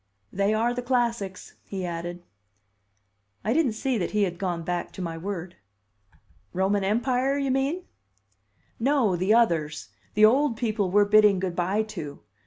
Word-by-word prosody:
"They 200 +2 +1
are 230 +3 +1
the 250 - -3
classics," 235 -6 -1
he 190 -2 -5
added. 175 +1 -5 1.2
I 220 - +1
didn't 285 -6 +2
see 245 +2 -1
that 180 - -1
he 210 -1 +1
had 175 -3 -2
gone 175 -3 -2
back 175 +1 -3
to - - -11
my 165 -1 -4
word. 175 0 -6 1.0
"Roman 195 +2 +1
Empire, 250 +6 +1
you 275 -2 0
mean?" 275 +7 0 1.0
"No, 250 -6 +2
the 185 +5 +2
others; 160 - +1 0.3
the 210 +1 +7
old 255 +1 +3
people 215 -5 0
we're 205 +2 +4
bidding 210 -2 +5
good 185 -2 -3
by 190 +5 +1
to. 170 -10 -8
205 Hz, 155 wpm, -26 LUFS, 180-240 Hz, 1.2 s, the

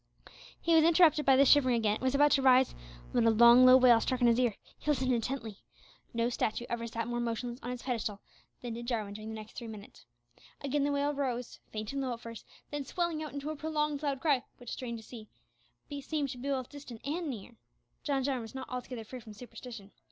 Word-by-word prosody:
He 335 - +1
was 320 -1 +6
interrupted 320 -3 +5
by 270 - +7
the 275 +1 +6
shivering 260 -3 +5
again, 215 -2 +1
and - - -19
was 260 +1 +1
about 290 +1 +5
to 275 - +4
rise, 260 -1 +5 0.4
when 235 -1 +3
a - - +7
long 235 +3 +7
low 255 0 +9
wail 245 -3 +6
struck 255 +2 -1
on 245 - +4
his 235 +1 +4
ear. 240 -5 +2 0.2
He - - -5
listened 260 -3 +2
intently. 230 -3 -3 0.5
No 230 0 0
statue 235 -1 -2
ever 235 0 -3
sat 230 0 -4
more 240 0 -2
motionless 240 +1 -3
on 245 - -6
its 250 -1 -5
pedestal 225 -5 -2 0.4
than 240 -2 -4
did 235 +1 -7
Jarwin 215 -5 -2
during 215 +1 -8
the 220 - -5
next 215 0 -9
three 235 - -6
minutes. 215 -2 -11 0.5
Again 280 +1 0
the 290 - +1
wail 285 +1 0
rose, 250 -4 -3
faint 215 +3 -5
and 275 - -2
low 255 -2 -2
at 230 - -7
first, 230 -1 -10 0.2
then 290 -1 -3
swelling 340 +2 -2
out 305 - -5
into 285 +2 -4
a - - -5
prolonged 300 -1 -1
loud 280 -3 -2
cry, 285 -6 +2
which, 245 -2 -9
strange 235 -3 -5
to 220 - -14
say, 220 -3 -10 0.7
seemed 290 0 -2
to 250 - -7
be 275 +3 -4
both 260 -3 -2
distant 275 -6 -10
and 320 +3 -2
near. 235 -1 -7 0.5
John 275 -3 0
Jarwin 265 -2 -1
was 225 +2 -10
not 260 -1 -6
altogether 250 -2 -5
free 255 +4 -9
from 220 -3 -12
superstition. 225 -2 -10
250 Hz, 230 wpm, -31 LUFS, 230-280 Hz, 0.7 s, low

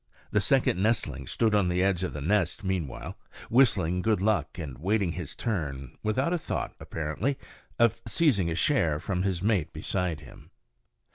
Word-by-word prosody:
The - - +3
second 90 - +2
nestling 75 - 0
stood 110 -2 +1
on 100 -4 +3
the 90 +1 +1
edge 95 -2 +1
of 95 - -2
the 75 - -5
nest 90 +3 +1
meanwhile, 95 -7 -3 0.3
whistling 95 -8 +4
good 110 0 +2
luck 95 -7 0
and 70 -7 -6
waiting 100 +1 +1
his 85 -3 -6
turn, 70 - -3
without 130 - 0
a 175 - 0
thought, - - -3
apparently, 80 - -2 0.4
of 115 0 +3
seizing 115 - +2
a 80 - -1
share 85 - +2
from 90 0 -2
his 95 -2 -1
mate 95 -7 +1
beside 90 -6 -2
him. 70 - -14
95 Hz, 165 wpm, -28 LUFS, 80-110 Hz, 0.4 s, whistling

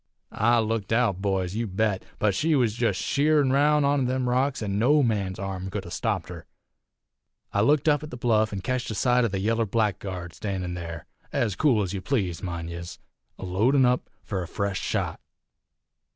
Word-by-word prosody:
"I 120 +3 +3
looked 110 -2 -1
out, 110 -5 +2
boys, 95 -2 -1
you 115 +2 -2
bet! 100 0 0
But 105 -2 +2
she 155 - +2
was 120 -6 +2
jest 115 -4 0
sheerin 145 -1 +2
roun' 145 +1 +4
onter 140 -2 +2
them 130 0 -1
rocks, 130 0 +1
an' 100 -1 -1
no 145 +6 +4
man's 100 -6 -1
arm 95 -1 -4
could - - -4
'a' - - -9
stopped - - -2
her. - - -9 1.1
I 100 - +2
looked 145 +6 +3
up 145 -2 +4
at 150 - -7
the 125 - -7
bluff, 110 -3 +2
an' 100 -2 -4
ketched 130 +3 -2
a 110 - -3
sight 125 +2 +3
o' - - +3
the 100 -2 -3
yaller 115 +3 +1
blackguard 95 -5 -2
standin' 90 0 -4
there 85 -3 -6 0.3
ez 105 -5 0
cool 125 -9 +3
ez 95 0 -4
ye 100 - -2
please, 95 - -1
mind 85 -2 -4
yez, 85 0 -7 0.4
a - - -7
loadin' 120 +9 +3
up 125 0 +1
fur 95 -3 -3
a 85 - -5
fresh 100 +1 -2
shot. - - -2
110 Hz, 195 wpm, -26 LUFS, 95-125 Hz, 1.1 s, roun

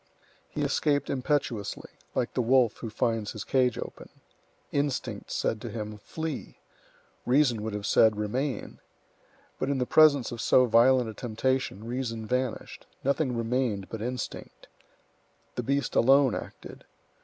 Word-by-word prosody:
He - - -3
escaped 145 -1 +1
impetuously, 130 -5 -2 0.2
like 120 - -1
the 125 - +1
wolf 120 -2 +3
who 115 - -6
finds 110 -1 -1
his 110 - -6
cage 125 -3 +2
open. - - -8 0.6
Instinct 140 -1 -2
said 110 - -1
to - - -5
him, 105 -2 -6
"Flee!" 160 +5 -6 0.7
Reason 125 -4 +3
would 110 -1 -4
have 105 -1 -4
said, 110 0 +4
"Remain!" 120 +4 -3 0.8
But 135 - -1
in 140 - +1
the 125 - 0
presence 145 -3 +5
of 120 - -5
so 130 - +5
violent 125 +1 +4
a 110 - -6
temptation, 120 -1 -2
reason 115 -2 -3
vanished; 125 +1 -3 0.2
nothing 140 -2 0
remained 115 -4 -1
but 115 - -6
instinct. 125 +2 -6 0.9
The - - -2
beast 140 +2 -1
alone 135 +2 +5
acted. - - -8
125 Hz, 140 wpm, -28 LUFS, 110-135 Hz, 0.9 s, presence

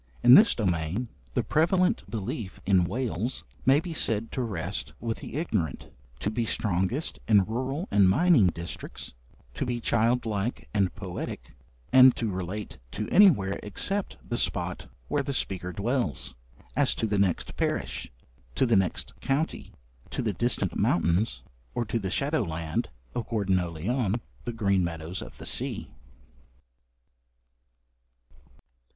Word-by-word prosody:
In 120 +1 +9
this 215 - +8
domain, 95 +3 -1 0.3
the - - +2
prevalent 180 +6 +2
belief 105 -2 -4
in 95 -2 +4
Wales 115 +2 -2 0.2
may 135 +2 +6
be 170 +1 -5
said 115 -6 +3
to 130 - -2
rest 90 - -3
with 115 -1 -3
the - - -8
ignorant, 105 - -2 0.3
to 105 - 0
be 115 +2 -1
strongest 105 - -1
in 105 -4 +5
rural 130 - -3
and 100 -2 +5
mining 145 - +5
districts, 85 -5 -5 0.4
to - - -2
be 120 -2 -2
childlike 115 -1 0
and 100 -5 +1
poetic, - - -6 0.4
and 130 -1 +8
to 115 -3 -2
relate 95 - -5
to 105 0 -3
anywhere 140 - +5
except 195 - -2
the 120 - -1
spot 85 -5 -1 0.2
where 145 - +1
the 140 0 -3
speaker 95 -7 -1
dwells 100 - -1 0.4
as - - +3
to - - -1
the 105 -2 0
next 95 -4 0
parish, - - -2 0.4
to - - +3
the 120 -2 +3
next 95 -2 0
county, 145 +4 -1 0.4
to - - -3
the - - 0
distant - - 0
mountains, 85 - +1 0.3
or 120 - 0
to 115 +2 -1
the 95 -3 -3
shadow 140 - +1
land 80 -4 -2 0.2
of 115 -2 -4
Gwerddonau 95 -5 +1
Llion, 110 - 0 0.3
the 120 - -3
green 100 -4 +2
meadows 85 +1 -4
of - - -10
the - - -9
sea. - - -2
105 Hz, 140 wpm, -27 LUFS, 95-125 Hz, 0.4 s, In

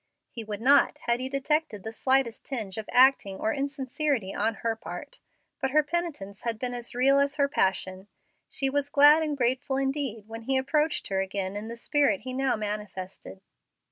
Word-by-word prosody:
He 230 - -6
would 210 -1 -6
not 275 +4 +5
had 235 0 +1
he 260 +1 -3
detected 275 - -1
the 220 - -6
slightest 260 -1 +1
tinge 220 -7 -5
of 215 - -7
acting 250 -7 +4
or 220 - 0
insincerity 275 -5 -2
on 220 +2 0
her 225 -1 +1
part, - - -9 0.4
but 265 - 0
her 305 +3 +4
penitence 295 - -4
had 230 -2 -2
been 245 +2 -3
as 240 0 -7
real 275 +3 +4
as 280 +1 +1
her 280 -2 +2
passion. 190 -5 -1 0.4
She 270 - -2
was 285 +1 -1
glad 290 +2 +7
and 300 -2 -1
grateful 255 +2 0
indeed 270 -5 -2
when 225 +1 -7
he 265 +3 0
approached 300 +4 0
her 190 -1 +1
again 195 0 -3
in 210 +2 -5
the 235 +1 -7
spirit 290 +3 +1
he 255 0 -6
now 265 0 +1
manifested. 205 -3 -6
255 Hz, 185 wpm, -27 LUFS, 215-280 Hz, 0.4 s, glad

